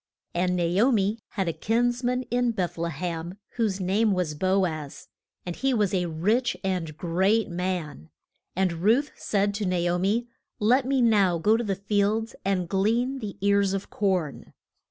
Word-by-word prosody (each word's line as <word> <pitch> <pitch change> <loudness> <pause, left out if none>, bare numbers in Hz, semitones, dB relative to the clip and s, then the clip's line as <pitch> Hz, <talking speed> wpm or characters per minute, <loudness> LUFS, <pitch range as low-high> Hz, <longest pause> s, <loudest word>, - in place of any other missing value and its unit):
And 180 +1 +1
Na 175 - 0 0.2
o 260 +4 +5
mi 210 0 +1
had 195 -4 -1
a 165 - 0
kins 240 +8 0
man 250 +1 0
in 245 -1 +1
Beth 180 -4 -2
le 170 0 -2
hem, 170 +2 -4 0.2
whose 210 -5 0
name 200 +3 +2
was 180 -5 -1
Bo 190 +5 +2
az, 155 -4 -6 0.4
and 175 -1 -4
he 270 -1 +1
was 205 -3 +1
a 180 -2 +1
rich 210 +10 0
and 175 -5 -2
great 190 +7 +1
man. 175 - -4 0.5
And 185 -1 +1
Ruth 235 +9 +3
said 205 0 0
to 205 0 -2
Na 180 0 +1 0.2
o 180 - 0
mi, 215 +6 0 0.3
Let 250 +5 +3
me 265 -2 +2
now 200 -6 +4
go 210 +7 +3
to 235 - 0
the 200 -3 -1
fields 205 +3 0
and 185 -2 0
glean 230 +9 +1
the 205 -4 -6
ears 200 -1 +3
of 195 0 -4
corn. 185 -8 -1
195 Hz, 180 wpm, -26 LUFS, 180-225 Hz, 0.5 s, o